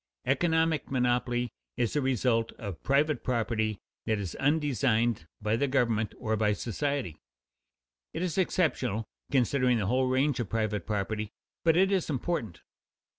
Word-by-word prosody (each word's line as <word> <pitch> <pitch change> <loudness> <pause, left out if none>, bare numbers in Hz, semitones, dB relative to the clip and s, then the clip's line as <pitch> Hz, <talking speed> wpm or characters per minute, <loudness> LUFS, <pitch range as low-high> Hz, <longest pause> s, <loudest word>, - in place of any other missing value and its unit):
Economic 160 +1 +2
monopoly 125 -1 +1 0.3
is 120 - 0
a 150 - +2
result 125 -3 +1
of 100 -7 -7
private 140 0 +2
property 110 -3 0 0.3
that 110 - +2
is 95 -4 -4
undesigned 125 - +1 0.2
by 105 +1 +2
the 140 +5 +1
government 115 -5 +1
or 110 -2 -1
by 105 -1 +2
society. 125 - -2 0.9
It 175 - -3
is 175 -4 -1
exceptional, 135 - +1 0.3
considering 125 -1 +3
the 105 - -1
whole 130 +5 +2
range 130 +1 +2
of 115 -6 -2
private 105 -4 -1
property, 105 0 -2 0.3
but 165 0 +4
it 190 +2 +4
is 190 -4 +1
important. 130 - -2
125 Hz, 140 wpm, -29 LUFS, 110-140 Hz, 0.9 s, but